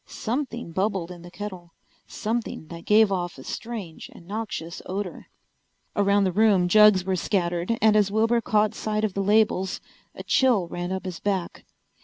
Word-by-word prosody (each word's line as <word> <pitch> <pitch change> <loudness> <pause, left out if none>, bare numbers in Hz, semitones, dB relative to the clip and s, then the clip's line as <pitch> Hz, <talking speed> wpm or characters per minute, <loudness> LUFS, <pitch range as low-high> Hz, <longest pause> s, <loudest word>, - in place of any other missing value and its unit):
Something 240 - -4
bubbled 190 -1 -1
in 175 -1 -10
the 175 - -11
kettle, 185 -3 -8 0.3
something 220 -7 -4
that 170 -1 -9
gave 215 -1 +5
off 175 -4 -2
a 130 - -10
strange 210 - -7
and 170 - -15
noxious 200 -5 -5
odor. 190 0 -5 0.7
Around 200 0 +3
the 190 - +1
room 195 -2 +3
jugs 210 -1 +6
were 190 -1 0
scattered, 175 +2 -1
and 215 -1 +5
as 205 -2 +4
Wilbur 225 +3 +2
caught 215 -3 +2
sight 215 0 -2
of 215 -3 0
the 195 - -1
labels 200 -2 +2 0.4
a - - -8
chill 240 -9 +3
ran 175 +1 -4
up 190 0 -4
his 180 -2 -5
back. 195 -4 -3
200 Hz, 170 wpm, -25 LUFS, 180-215 Hz, 0.7 s, jugs